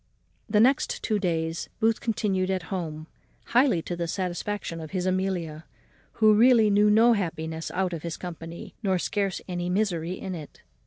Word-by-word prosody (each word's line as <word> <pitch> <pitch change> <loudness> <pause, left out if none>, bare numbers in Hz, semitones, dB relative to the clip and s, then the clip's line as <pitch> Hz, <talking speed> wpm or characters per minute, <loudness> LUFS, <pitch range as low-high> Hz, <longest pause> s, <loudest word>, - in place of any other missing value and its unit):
The 210 - +2
two 210 - +7
next 265 +2 +1
days 165 -2 -1
Booth 225 0 +2
continued 195 -5 0
at 190 -2 -1
home, 155 -4 -4 0.4
highly 240 - +3
to 175 - -4
the 170 0 -3
satisfaction 180 0 -3
of 160 - -7
his 185 0 -2
Amelia, 185 -4 -1 0.5
who 215 -1 +5
really 225 -1 +5
knew 205 +1 +5
no 225 +3 +6
happiness 160 -5 -3
out 185 -1 -1
of 165 - -4
his 170 -1 -5
company, 170 -1 -8
nor 190 -4 +1
scarce 195 +1 -1
any 175 -1 -3
misery 180 -3 0
in 190 0 -5
it. 155 -4 -9
185 Hz, 165 wpm, -26 LUFS, 165-210 Hz, 0.5 s, two